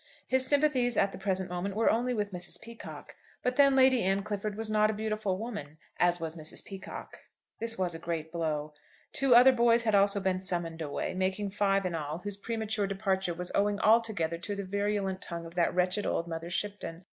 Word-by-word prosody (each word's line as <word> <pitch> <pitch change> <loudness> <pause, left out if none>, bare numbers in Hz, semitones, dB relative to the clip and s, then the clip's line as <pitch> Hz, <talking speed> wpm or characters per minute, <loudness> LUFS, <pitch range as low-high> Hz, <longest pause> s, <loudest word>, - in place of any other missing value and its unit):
His 260 0 +2
sympathies 275 -5 +2
at 195 - +3
the - - -8
present 190 -1 -1
moment 180 +2 -3
were 225 +1 +3
only 240 +3 0
with 210 -4 -1
Mrs. 175 0 -2
Peacocke. 230 0 -10 0.3
But 250 0 0
then 275 -1 +5
Lady 260 -2 +5
Anne 195 +1 +1
Clifford 210 0 -3
was 225 0 -2
not 215 0 +3
a 215 - -1
beautiful 215 -3 -1
woman, 205 -9 -6 0.2
as 175 0 +3
was 165 -1 -4
Mrs. 155 -1 -3
Peacocke. 195 -3 -8 0.4
This 230 0 -2
was 180 -2 -1
a 165 - -6
great 165 -1 -4
blow. 155 -3 -2 0.4
Two 265 -3 +4
other 250 +2 +9
boys 235 -1 +4
had 220 -2 +1
also 200 0 +4
been 190 -1 0
summoned 170 -3 -3
away, 145 -2 -3
making 190 +2 -1
five 195 -1 +1
in 180 - -1
all, 155 -1 -3
whose 205 +3 -6
premature 220 -1 -2
departure 190 -3 -1
was 180 +1 -4
owing 205 0 +1
altogether 215 -8 +2
to 205 +4 -4
the 200 -1 -4
virulent 200 -1 -1
tongue 170 -1 -6
of 165 - -10
that 175 -1 +2
wretched 185 +3 +1
old 170 - -1
Mother 165 0 -5
Shipton. 185 -3 -4
195 Hz, 200 wpm, -30 LUFS, 175-220 Hz, 0.4 s, other